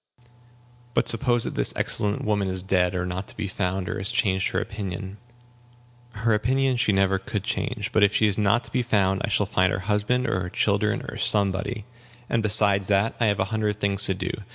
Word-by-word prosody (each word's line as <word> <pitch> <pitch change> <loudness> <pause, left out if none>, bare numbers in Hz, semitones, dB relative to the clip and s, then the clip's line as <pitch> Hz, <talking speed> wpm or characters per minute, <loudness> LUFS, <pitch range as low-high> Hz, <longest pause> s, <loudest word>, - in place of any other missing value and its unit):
"But - - +2
suppose 120 0 +3
that - - -3
this - - +2
excellent 105 0 -1
woman 105 -2 0
is 95 -1 -2
dead, 90 -1 +1
or 90 0 -1
not 90 +1 -5
to - - -8
be 105 - -3
found, 95 -1 -3
or - - -3
has 95 - -2
changed 100 -5 0
her - - -1
opinion?" 100 -1 -6 1.0
"Her 115 +1 0
opinion 130 +4 +1
she 120 - +2
never 95 -1 +2
could 105 -3 -4
change. 110 +1 -3
But 110 - +2
if 100 0 +4
she 110 - +3
is 105 -2 +2
not 105 +3 +2
to - - -12
be 125 - 0
found, 100 -5 +1
I - - -1
shall 105 0 +1
find 95 -2 +1
her - - -1
husband, 105 +6 0
or 95 - 0
her 90 - -4
children, - - 0
or - - -7
somebody; 100 +2 0 0.5
and 115 - +2
besides 100 -2 +4
that, 100 +2 +1
I 115 - +2
have 105 -1 0
a 95 - +1
hundred 105 -1 -1
things 100 -1 0
to 95 - 0
do. 95 0 -3
100 Hz, 215 wpm, -24 LUFS, 95-110 Hz, 1.0 s, if